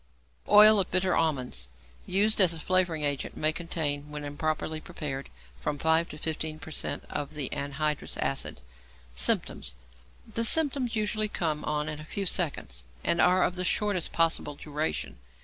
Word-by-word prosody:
=Oil 210 0 +9
of 190 - 0
Bitter 185 0 +2
Almonds=, 130 - 0 0.4
used 205 +3 +3
as 175 -3 +6
a - - -7
flavouring 175 -2 +1
agent, 145 -2 -1
may 155 0 +2
contain 150 -3 -2
(when 150 0 -6
improperly 155 +2 -2
prepared) 140 -3 -5 0.3
from 105 - -2
5 160 +3 +2
to 150 - -9
15 155 0 -3
per 155 +1 -10
cent. - - -3
of 145 0 -4
the 145 -3 -2
anhydrous 145 +2 -2
acid. - - -2 0.5
Symptoms. 60 0 +1 0.5
The 230 +1 -2
symptoms 270 -2 +2
usually 215 0 0
come 155 -6 -2
on 150 0 -1
in 150 0 -4
a - - -8
few 195 +6 -4
seconds, 140 - -1 0.2
and 170 - +2
are 180 +1 +5
of - - +1
the 180 0 -3
shortest 200 -1 0
possible 165 -3 +1
duration. 150 - -3
160 Hz, 160 wpm, -28 LUFS, 145-185 Hz, 0.5 s, =Oil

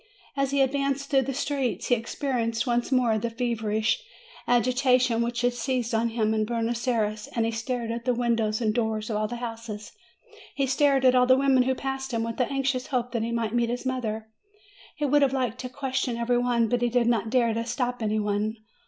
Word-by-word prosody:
As 275 -1 +1
he 280 0 +2
advanced 275 +1 -1
through 270 -1 +5
the 270 +1 -3
streets, 275 -3 -2
he - - +5
experienced 230 -1 -1
once 240 +1 0
more 240 -4 +3
the 235 +2 -2
feverish 225 - -1 0.5
agitation 250 0 +3
which 235 +1 -1
had 245 0 +2
seized 245 0 -2
on 225 +1 +2
him 220 -1 0
at 215 -1 0
Buenos 235 +1 -2
Ayres; 215 -3 0
he 230 0 +1
stared 230 0 -3
at 235 0 -5
the 250 - +2
windows 230 -2 0
and 215 -2 +1
doors 220 -1 -1
of - - -1
all 215 0 0
the 240 - -5
houses; 230 -3 -6 0.6
he 275 - +1
stared 270 0 +2
at 255 - +6
all 250 0 +4
the 260 0 +6
women 270 -1 +4
who 260 +1 +1
passed 270 0 -4
him, 225 - 0
with 230 +1 -4
an 250 - +1
anxious 270 -2 -1
hope 250 -3 -1
that 235 -2 -1
he 230 +1 -2
might 230 -2 -1
meet 240 -1 +1
his 245 +2 -3
mother; 225 -4 -2 0.7
he 295 - -1
would 290 +1 +3
have 270 -1 +3
liked 250 -3 -1
to 255 - -5
question 255 -2 -2
every 240 +1 +1
one, 240 -2 +2
but 245 +1 0
he 240 - +2
did 240 0 +2
not 230 -2 +1
dare 235 -2 +2
to 230 +1 -1
stop 245 +1 -2
any 215 0 0
one. 210 +1 -1
240 Hz, 215 wpm, -26 LUFS, 225-255 Hz, 0.7 s, at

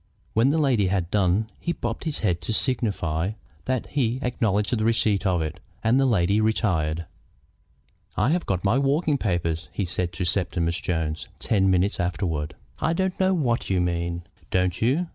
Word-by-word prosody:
When 115 +4 +4
the 150 - +2
lady 130 -10 +3
had 90 -2 -1
done 105 +2 +2
he 170 - -1
bobbed - - -4
his 155 -3 -2
head 90 -5 +1
to 110 - -3
signify 100 - 0 0.3
that 130 -2 0
he 125 -4 0
acknowledged 110 -3 +1
the 110 - -1
receipt 110 -3 +2
of 90 -3 +2
it, 80 +3 -5 0.2
and 115 +4 +4
the 135 - +4
lady 100 -2 +3
retired. 85 -7 +1 1.1
"I 105 +7 +3
have 175 +1 0
got 95 0 -1
my 110 +7 +3
walking 140 +1 +2
papers," 85 -5 -1
he 100 - -2
said 90 0 -2
to 85 +2 -2
Septimus 85 -2 0
Jones 80 -2 -2
ten 95 -3 +2
minutes 95 +2 +2
afterward. 85 -4 -1 0.2
"I - - +1
don't 190 +1 -1
know 190 0 +3
what 125 -8 0
you 95 -2 +2
mean." 85 0 -1 0.3
"Don't 90 -1 0
you? 135 +10 +2
100 Hz, 175 wpm, -25 LUFS, 85-120 Hz, 1.1 s, When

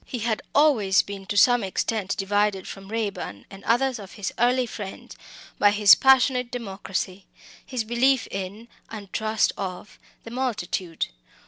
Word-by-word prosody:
He 250 - -6
had 220 -2 0
always 230 -11 +4
been 195 -1 -8
to 205 - -2
some 245 +2 +5
extent 195 +1 -2
divided 205 -1 0
from 195 0 -9
Raeburn 205 - -4
and 195 0 -11
others 250 +1 +1
of 195 -2 -10
his 205 -3 -4
early 250 +2 +3
friends 205 -4 -8 0.4
by 205 - +6
his 205 -1 +7
passionate 260 -2 +4
democracy 195 -4 -5 0.4
his 255 -3 -3
belief 240 +3 +2
in, 195 +4 -6 0.2
and 205 -4 -9
trust 220 0 +1
of, 190 +1 -6 0.2
the 230 - -10
multitude. 205 -9 -2
210 Hz, 145 wpm, -25 LUFS, 195-240 Hz, 0.4 s, his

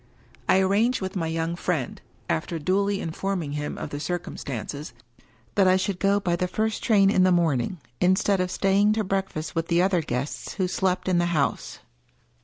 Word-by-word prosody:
I - - +6
arranged 210 +6 +2
with 190 0 -5
my 165 -4 -1
young 165 +1 -2
friend 170 -7 -2
— - - -35
^after 80 - -1
duly 195 +5 +1
informing 170 -1 -3
him 150 0 -4
of - - -6
the 145 - -4
circumstances 145 -5 -5 0.3
— 110 0 -34
^that 195 -2 +4
I 185 - +5
should 190 0 -2
go 200 +1 +3
by 175 -3 0
the 180 +1 -1
first 220 +3 -1
train 200 -3 +4
in 185 - +3
the 185 0 +5
morning, 165 -3 +1 0.2
instead 190 +1 +3
of 180 - -1
staying 195 +3 +3
to 220 0 0
break 195 0 -1
fast 155 0 -5
with 165 0 -1
the 170 +1 +3
other 185 -2 +2
guests 135 -1 -4
who 190 -2 0
slept 185 0 -1
in 180 -2 +3
the 175 - +2
house. 140 - -1
180 Hz, 200 wpm, -25 LUFS, 160-195 Hz, 0.3 s, I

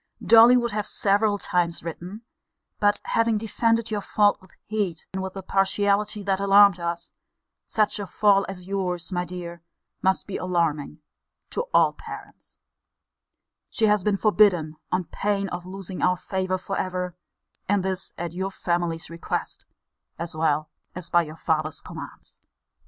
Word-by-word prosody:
Dolly 235 +2 +8
would 240 -1 0
have 210 0 -2
several 205 +1 +2
times 175 -3 0
written: 180 +6 -7 0.6
but 205 0 +3
having 230 -1 +1
defended 230 +1 0
your 210 -1 -1
fault 205 0 +2
with 185 - -19
heat, 200 -7 -2
and 190 - -2
with 190 0 -5
a 195 - -6
partiality 200 +2 +1
that 195 -1 0
alarmed 200 -1 +6
us, 170 0 -4 0.5
(such 215 -1 +1
a 200 - -4
fall 200 0 +3
as 180 -2 -7
your's, 185 -2 -2
my 180 -1 -1
dear, 175 -1 -7 0.4
must 190 0 +1
be 200 - -4
alarming 165 -4 -1 0.5
to 480 - -2
all - - +4
parents,) - - -11 1.1
she 225 - +1
has 210 -2 +3
been 205 0 +1
forbidden, 195 -7 +3 0.2
on 185 0 +1
pain 200 +2 -1
of 175 +1 -6
losing 190 -1 -6
our 180 0 +3
favour 185 0 -2
for 195 +1 -5
ever: 180 -1 -3 0.5
and 200 -2 +2
this 190 0 -3
at 170 -1 -4
your 190 +2 -2
family's 170 -3 -2
request, 165 0 -4 0.5
as 165 -1 -5
well 155 -1 0 0.2
as 180 -1 -7
by 175 0 +5
her 155 - -9
father's 155 -2 -1
commands. - - -10
190 Hz, 150 wpm, -25 LUFS, 175-205 Hz, 1.1 s, Dolly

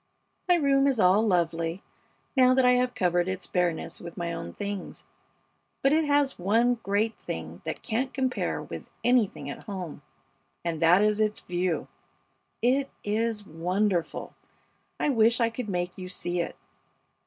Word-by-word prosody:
My 355 - +7
room 275 -4 +3
is 265 -4 +1
all 190 +2 +5
lovely, 170 -3 0 0.5
now 255 -1 +6
that 260 -1 +4
I 250 - +6
have 250 0 +2
covered 175 -1 +2
its 185 -1 -3
bareness 175 -2 -1
with 170 -1 -9
my 170 -1 -2
own 85 - -5
things, 200 - -6 0.8
but 275 +2 +4
it 315 0 +3
has 285 -4 +2
one 230 +6 +2
great 210 +3 0
thing - - -6
that - - -4
can't 255 +3 -1
compare 260 -2 -1
with - - -8
anything 235 - +2
at 140 - -7
home, 185 -6 -6 0.6
and 165 -2 -2
that 175 +4 +6
is 210 0 +2
its 215 0 +1
view. 180 -1 -1 0.8
It 270 +3 +2
is 215 0 -1
wonderful! 180 +2 -1 0.7
I - - +1
wish 230 -1 +4
I 230 -1 +2
could 225 -1 -5
make 180 0 -2
you 185 0 -6
see 175 -1 -2
it. - - -4
205 Hz, 155 wpm, -27 LUFS, 175-250 Hz, 0.8 s, My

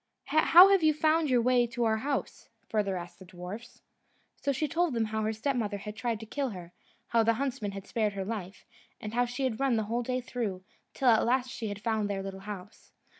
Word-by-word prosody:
"How 330 +5 +7
have 395 -2 +4
you 310 -1 +4
found 310 0 +2
your 245 -2 +3
way 245 -1 +3
to 235 +1 -2
our 220 -1 +2
house?" 275 +5 -3 0.2
further 200 -3 0
asked 175 0 -9
the 190 - -12
dwarfs. 185 +6 -9 0.5
So 280 - -1
she 290 +3 -1
told 330 -3 0
them 225 -1 +1
how 220 0 -2
her 215 0 0
stepmother 220 -2 -1
had 210 +1 -7
tried 230 -1 -2
to - - -7
kill 275 +4 -2
her, 180 -4 -9 0.4
how 230 - +3
the 225 +1 +3
huntsman 240 -5 -3
had 195 0 -7
spared 215 -3 -1
her 195 -1 -4
life, 195 -3 -6 0.3
and 210 0 -6
how 245 +1 +2
she 245 +3 -4
had 245 -4 -1
run 270 -3 +2
the 220 - +1
whole 230 +3 -1
day 255 +1 -1
through, 225 -7 -4 0.3
till 265 -3 +3
at 225 -2 +5
last 255 +1 +1
she 225 - -5
had 205 0 -6
found 220 -2 0
their 195 -1 -2
little 195 0 -6
house. 200 0 -10
230 Hz, 225 wpm, -29 LUFS, 205-255 Hz, 0.5 s, How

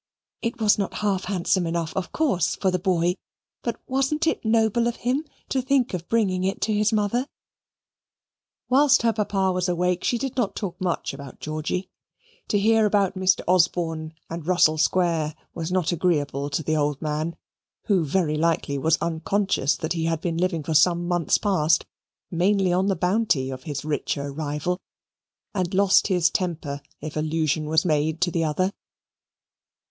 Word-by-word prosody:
It 235 +1 -3
was 210 -1 +3
not 200 - -2
half 195 -2 0
handsome 185 -2 0
enough 165 -1 -2
of 190 -2 -3
course 250 - +1
for 190 - 0
the 180 - 0
boy, 175 -1 +1 0.5
but - - -3
wasn't 275 +4 0
it 325 - 0
noble 225 +1 +2
of 240 - -1
him 275 +5 0 0.2
to 265 - +1
think 260 -2 +1
of 175 -1 -5
bringing 195 -5 +1
it 190 +1 -1
to 215 - +1
his 210 0 +2
mother? 220 +5 0 1.4
Whilst 275 0 +4
her 230 -1 +3
papa 195 -3 0
was 180 0 -1
awake 180 0 0
she 240 - +1
did 270 +1 -4
not 240 -6 -1
talk 180 -4 -5
much 180 -6 -1
about 135 -1 -10
Georgy. 155 +4 -3 0.6
To 205 - +1
hear 220 +1 +4
about 200 -2 +2
Mr. 185 0 +2
Osborne 165 -3 +1
and 165 -1 -7
Russell 170 -4 +4
Square 165 -3 +1 0.2
was 165 0 -4
not 180 -2 +1
agreeable 150 -5 0
to 145 +3 -2
the 155 +2 0
old 145 -2 0
man, 155 +2 -2 0.5
who 190 -5 +2
very 155 0 0
likely 155 -3 0
was 160 +3 +3
unconscious 170 -3 0
that 160 - -3
he 165 -1 -2
had 165 -1 0
been 165 -1 -2
living 175 -3 0
for 160 - -2
some 175 +3 +3
months 175 -2 +2
past 165 -6 +2 0.5
mainly 185 +1 +2
on 185 +2 +2
the 195 - +2
bounty 180 -7 +1
of 130 0 -8
his 145 -1 -4
richer 145 -1 -2
rival, 155 +4 -2 0.7
and 185 -2 -1
lost 195 0 +4
his 180 -3 +2
temper 155 -6 -3 0.2
if 155 - -6
allusion 155 0 0
was 160 +2 +2
made 155 0 +1
to 175 0 +2
the 165 0 0
other. 185 +5 0
180 Hz, 170 wpm, -24 LUFS, 160-200 Hz, 1.4 s, Whilst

